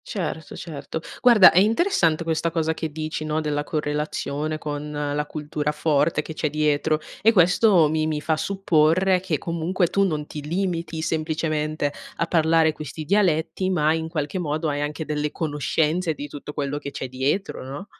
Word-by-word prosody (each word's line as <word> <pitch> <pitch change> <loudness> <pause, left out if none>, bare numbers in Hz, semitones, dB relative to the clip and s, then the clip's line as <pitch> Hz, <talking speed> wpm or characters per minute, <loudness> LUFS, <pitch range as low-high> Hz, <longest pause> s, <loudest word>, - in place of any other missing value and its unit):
Certo, 160 -6 -4
certo. 160 -1 -6 0.2
Guarda, 235 -6 +8
è 180 - +5
interessante 200 - +2
questa 165 0 0
cosa 160 -1 0
che 160 -1 -4
dici, 155 0 -4
no, 155 0 -1
della 150 -1 -1
correlazione 150 0 -2
con 150 -1 -5
la 150 0 -2
cultura 150 0 -3
forte 150 0 +1
che 160 - -7
c'è 155 0 -1
dietro 155 +1 +1 0.2
e 225 - +6
questo 180 -2 +5
mi 155 +1 0
mi 155 -1 -1
fa 155 +1 0
supporre 185 0 +2
che 180 -4 -1
comunque 170 +3 -1
tu 200 +3 0
non 155 -6 -1
ti 150 - -7
limiti 165 -1 -2
semplicemente 155 -2 -1 0.2
a - - 0
parlare 160 -1 +3
questi 155 +1 -7
dialetti, 175 -1 +1
ma, 155 -4 +2
in 160 0 -2
qualche 150 +1 -3
modo, 155 -1 -1
hai 145 0 -2
anche 150 +1 -3
delle 150 0 -2
conoscenze 160 +2 0
di 145 - -6
tutto 145 0 -8
quello 145 0 -2
che 140 - -6
c'è 135 - -5
dietro, 135 +10 -2
no? 140 +8 -7
155 Hz, 170 wpm, -23 LUFS, 150-170 Hz, 0.2 s, Guarda